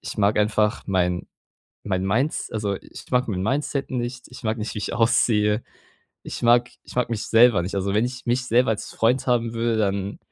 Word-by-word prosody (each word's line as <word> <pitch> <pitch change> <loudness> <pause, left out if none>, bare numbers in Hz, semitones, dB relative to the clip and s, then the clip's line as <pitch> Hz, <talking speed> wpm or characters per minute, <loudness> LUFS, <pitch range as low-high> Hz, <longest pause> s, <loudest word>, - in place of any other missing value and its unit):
ich - - -7
mag 105 0 +2
einfach 105 0 +1
mein 90 -2 0 0.6
mein 95 -2 -1
Mins 125 +10 0
also, 105 -2 -1
ich - - -12
mag 125 0 +1
mein 95 -3 -2
Mindset 140 +5 -1
nicht. 125 0 -4
Ich 125 - -13
mag 110 0 -1
nicht, 110 0 -4
wie - - -2
ich - - -4
aussehe. 110 -2 +2 0.6
Ich - - -7
mag 120 +1 +4
ich - - -12
mag 125 -1 +1
mich 110 -2 -3
selber 115 -5 +5
nicht. 95 - -4
Also, 100 0 -1
wenn 110 +3 +3
ich 125 +1 -6
mich 125 +2 0
selber 125 0 +3
als 110 - -3
Freund 120 +3 +1
haben 120 -2 +1
würde, 115 -1 0
dann 100 -1 -1
115 Hz, 205 wpm, -23 LUFS, 105-120 Hz, 0.6 s, selber